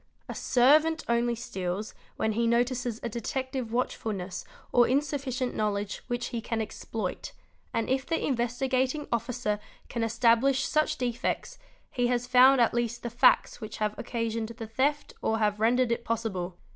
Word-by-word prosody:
A - - -5
servant 305 +6 +4
only 235 0 +2
steals 195 -2 -4 0.2
when 220 - 0
he 230 +2 +1
notices 240 0 +1
a - - -1
detective 255 +2 -3
watchfulness 205 -6 -2 0.3
or 240 -1 +5
insufficient 265 -2 -1
knowledge 205 -1 -1
which 240 -1 -2
he 235 -2 -3
can 230 0 -2
exploit, 215 -2 -4 0.4
and 230 - -1
if 265 +1 0
the 330 0 0
Investigating 260 +3 0
Officer 235 -2 -1 0.3
can 235 - -3
establish 235 +4 +3
such 305 0 +1
defects 240 -2 -2 0.3
he 245 -1 +1
has 245 0 0
found 255 +1 +6
at 235 - +4
least 235 0 -1
the 235 - -3
facts 240 +1 +4
which 215 0 -6
have 215 -1 0
occasioned 230 -1 -2
the 230 0 -7
theft 275 +6 0
or 225 - +1
have 210 -1 +1
rendered 240 +2 +3
it 235 0 -1
possible. 195 -7 -3
235 Hz, 155 wpm, -28 LUFS, 225-255 Hz, 0.4 s, found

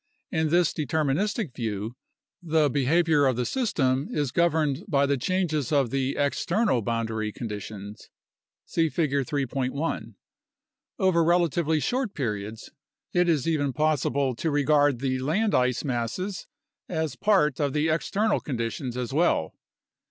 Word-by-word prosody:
In 160 -3 +1
this 175 0 +3
deterministic 155 - -1
view 110 0 -4 0.5
the 160 -4 +2
behavior 150 +1 +3
of 130 - +1
the 125 +1 -1
system 140 - 0
is 145 -4 -1
governed 155 -4 +1
by 140 -6 +3
the 140 0 +1
changes 155 -2 -1
of 140 -6 +2
the 135 0 -1
external 155 - +1
boundary 110 -1 -2
conditions 105 -2 -7 0.6
(see 165 -1 +1
Figure 140 -4 0
3.1). 140 +1 -2 0.8
Over 185 -5 +3
relatively 165 -2 +2
short 245 - -1
periods, 110 -4 -4 0.4
it 175 -1 +3
is 155 -3 +1
even 145 -4 +1
possible 140 -3 +1
to 165 - -1
regard 145 -3 +3
the 130 -1 0
land 185 +11 0
ice 125 -1 +2
masses 140 - -3 0.4
as 160 -3 -2
part 185 -10 +2
of 145 -3 0
the 150 +1 +1
external 205 +7 +1
conditions 120 -1 -4
as 125 +1 -3
well. 150 - +2
145 Hz, 130 wpm, -26 LUFS, 130-165 Hz, 0.8 s, this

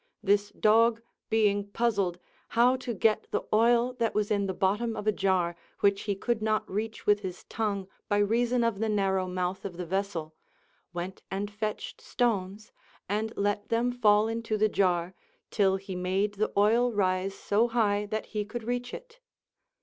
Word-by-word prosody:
This 205 0 +2
dog 225 +2 +3 0.3
being 205 -2 +2
puzzled 200 -5 0 0.4
how 245 +2 +6
to 255 -1 -5
get 215 +2 +2
the - - -1
oil 235 +3 +4
that 230 -1 0
was 210 -1 0
in 200 -1 +1
the 190 - -2
bottom 210 +5 0
of 210 - -5
a 215 - +4
jar, 185 -4 +1 0.3
which 200 0 +3
he 200 - +1
could 225 +3 -1
not 215 0 0
reach 220 +3 -4
with 205 0 +4
his 185 -3 -7
tongue 200 -4 -2 0.2
by 205 - +2
reason 235 +4 +2
of 230 -4 0
the 225 0 0
narrow 190 -3 +1
mouth 180 +1 -2
of 180 -3 -6
the 180 - -4
vessel, 180 -3 -3 0.6
went 175 +2 -5
and 200 +2 -3
fetched 210 +1 -4
stones 210 -3 -1 0.4
and 215 +3 -1
let 205 0 -1
them 235 +2 +1
fall 215 -3 +4
into 225 -1 -2
the 215 +1 +3
jar 180 -3 +1 0.4
till 195 -3 +3
he 195 -1 -6
made 190 +3 0
the 210 +2 -1
oil 230 +4 +4
rise 190 -2 0
so 215 +5 +1
high 210 -3 +1
that 215 +1 -3
he 210 -1 -3
could 225 +3 -6
reach 245 +1 -3
it. - - -12
205 Hz, 175 wpm, -28 LUFS, 195-225 Hz, 0.6 s, how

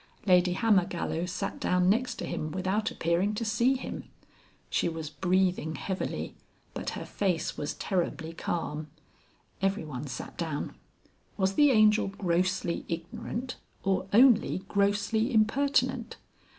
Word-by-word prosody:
Lady 180 -2 +5
Hammergallow 180 -5 +1
sat 180 - -4
down 180 0 +2
next 235 +6 +2
to - - -5
him 155 - -3
without 190 +4 0
appearing 175 +5 0
to 230 - -2
see 235 +5 +2
him. 260 - -6 0.6
She - - +1
was 160 -2 -5
breathing 180 -1 +1
heavily, 185 +7 -3 0.4
but - - -3
her - - -5
face 185 -5 -1
was 145 - -3
terribly 170 -4 -2
calm. 155 -2 -3 0.7
Everyone 155 -9 -2
sat 125 -2 -6
down. 160 -4 -3 0.6
Was 190 -1 +1
the 290 +6 +5
Angel 215 -4 +5
grossly 185 -2 0
ignorant 180 +9 -4 0.3
or 190 -1 0
only 230 -4 +5
grossly 205 +2 +1
impertinent? 255 +6 +1
190 Hz, 125 wpm, -29 LUFS, 170-215 Hz, 0.7 s, Lady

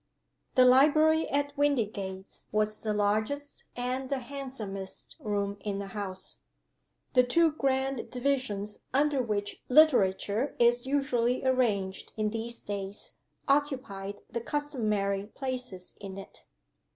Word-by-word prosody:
THE 255 -2 +7
Library 310 +5 +5
at 285 0 0
Windygates 210 -9 -1
was 215 0 +1
the 215 - -1
largest 215 +8 0
and 255 +2 -2
the 275 - 0
handsomest 240 -8 -6
room 200 -1 -2
in 200 0 -3
the 200 0 -5
house. 190 -3 -4 0.7
The 250 - +7
two 320 +7 +3
grand 270 -3 0
divisions 245 -6 -1 0.2
under 285 -1 +3
which 205 -3 -2
Literature 250 -4 +4
is 240 +1 +3
usually 255 -3 +1
arranged 215 -7 +1
in 215 -1 0
these 230 +1 -1
days 200 0 -5 0.3
occupied 260 -9 0
the 235 - -4
customary 215 -9 -1
places 250 -7 -5
in 195 -1 -7
it. 195 - -11
240 Hz, 115 wpm, -29 LUFS, 205-275 Hz, 0.7 s, THE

